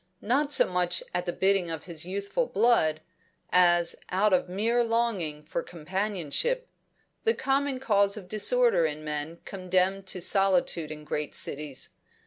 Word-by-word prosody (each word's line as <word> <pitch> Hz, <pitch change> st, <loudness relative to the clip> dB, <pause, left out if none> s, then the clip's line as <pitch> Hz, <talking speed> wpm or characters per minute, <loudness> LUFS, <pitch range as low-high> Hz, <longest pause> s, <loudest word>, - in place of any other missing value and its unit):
Not 280 Hz, +6 st, +1 dB
so -, -, +5 dB
much 180 Hz, -1 st, 0 dB
at 180 Hz, 0 st, -2 dB
the -, -, +1 dB
bidding 190 Hz, -1 st, +1 dB
of 160 Hz, -2 st, -5 dB
his 170 Hz, -2 st, -5 dB
youthful 200 Hz, -, -2 dB
blood, 160 Hz, -10 st, +2 dB, 0.5 s
as 175 Hz, -1 st, +4 dB
out 195 Hz, +2 st, +2 dB
of 180 Hz, -, +2 dB
mere 230 Hz, +6 st, +1 dB
longing 220 Hz, -10 st, -1 dB
for 165 Hz, +2 st, -3 dB
companionship, 190 Hz, -, -2 dB, 0.6 s
the 455 Hz, 0 st, +2 dB
common 275 Hz, 0 st, 0 dB
cause 200 Hz, -4 st, +2 dB
of 195 Hz, -4 st, -9 dB
disorder 215 Hz, -, +3 dB
in 155 Hz, 0 st, -6 dB
men 150 Hz, +2 st, -4 dB
condemned 190 Hz, +1 st, 0 dB
to 185 Hz, -, -2 dB
solitude 180 Hz, -4 st, +1 dB
in 155 Hz, 0 st, -8 dB
great 150 Hz, 0 st, -3 dB
cities. 145 Hz, -2 st, -3 dB
185 Hz, 145 wpm, -27 LUFS, 165-215 Hz, 0.6 s, so